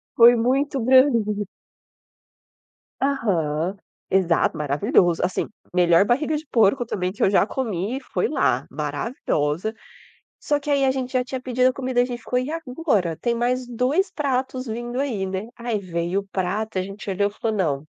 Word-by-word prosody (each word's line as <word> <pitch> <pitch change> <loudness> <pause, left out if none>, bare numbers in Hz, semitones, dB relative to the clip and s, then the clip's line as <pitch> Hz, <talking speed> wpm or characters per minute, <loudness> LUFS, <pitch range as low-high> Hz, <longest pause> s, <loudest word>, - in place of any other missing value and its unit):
Foi 240 +1 +8
muito 270 +4 +1
grande. 230 -5 +3 1.6
Aham. 185 - 0 0.3
Exato, 175 -3 +2
maravilhoso, 150 +4 +2
assim, 185 - -1 0.3
melhor 175 +1 +5
barriga 300 +7 +1
de 310 - -8
porco 235 +2 +3
também 185 -4 -2
que 205 - -3
eu - - +5
já 195 - +4
comi, 225 0 -3
foi - - +1
lá, - - +1
maravilhosa, 170 - -2 0.7
só 290 - 0
que 290 - -7
aí 280 -1 +3
a - - +3
gente 260 -1 -4
já 255 -1 +2
tinha 260 0 -5
pedido 255 0 +2
a - - -3
comida, 255 -2 0
a - - +2
gente 245 -1 -5
ficou: 250 +2 -1
"E 255 +3 -3
agora? 255 - -1
Tem 235 -1 +1
mais 250 +1 0
2 260 - +1
pratos 260 -2 -2
vindo 240 +2 -4
aí, 225 -9 -1
né". 190 +4 -4
Aí 235 -2 -2
veio 175 +1 -2
o 200 - -18
prato, 195 +3 -2
e - - +2
a - - -1
gente 200 +1 -8
olhou, 200 +2 +1
falou: 220 +1 -3
"Não, 145 -6 0
230 Hz, 170 wpm, -23 LUFS, 190-255 Hz, 1.6 s, Foi